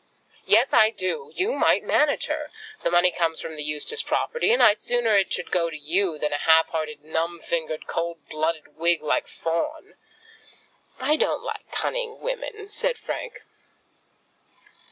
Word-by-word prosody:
"Yes, - - +4
I 215 - +7
do. 230 - -3
You 400 +7 0
might - - +3
manage 300 -1 +2
her. 305 0 -3 0.3
The - - 0
money 175 +1 +4
comes 165 -2 -1
from 160 - -7
the 150 - -4
Eustace 150 - +1
property, 475 0 0
and 485 - +4
I'd 210 0 +5
sooner 240 -2 +1
it 200 -2 +3
should - - -3
go 170 -2 +1
to 155 - -7
you 165 +3 0
than 150 0 -2
a 145 - -1
half 160 +1 +5
hearted, 155 -2 -4
numb 165 +2 -2
fingered, 160 -2 -3
cold 170 0 -4
blooded 155 -1 -3
Whig, 170 -1 +3
like 150 - 0
Fawn." 305 - -3 1.1
"I 295 +4 +2
don't - - 0
like - - -7
cunning - - -2
women," 430 -4 -5
said 485 +3 -1
Frank. - - -6
175 Hz, 160 wpm, -24 LUFS, -, 1.1 s, I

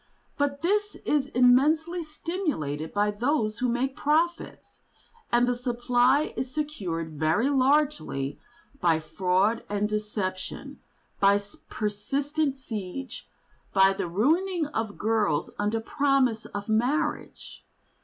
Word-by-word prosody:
But 285 +1 -1
this 415 +3 +1
is 285 -2 +1
immensely 295 +8 +3
stimulated 305 - -3
by 205 0 +1
those 220 -1 0
who 250 - +1
make 260 +3 -1
profits, 325 +4 -1 0.5
and 240 +1 +4
the 245 - +2
supply 245 +3 +1
is 255 0 -3
secured 175 - -4
very 165 - +2
largely 270 - +1 0.4
by 165 -6 +3
fraud 190 +7 +1
and 205 0 0
deception, 210 -3 -4 0.4
by 200 0 +5 0.3
persistent 275 +8 -1
siege, 230 0 -7 0.4
by 195 0 +5
the 190 - -3
ruining 320 - +1
of 225 -8 -4
girls 210 -9 0
under 210 +2 0
promise 270 -2 +1
of 205 0 -6
marriage. 255 +9 -1
245 Hz, 110 wpm, -27 LUFS, 205-290 Hz, 0.5 s, by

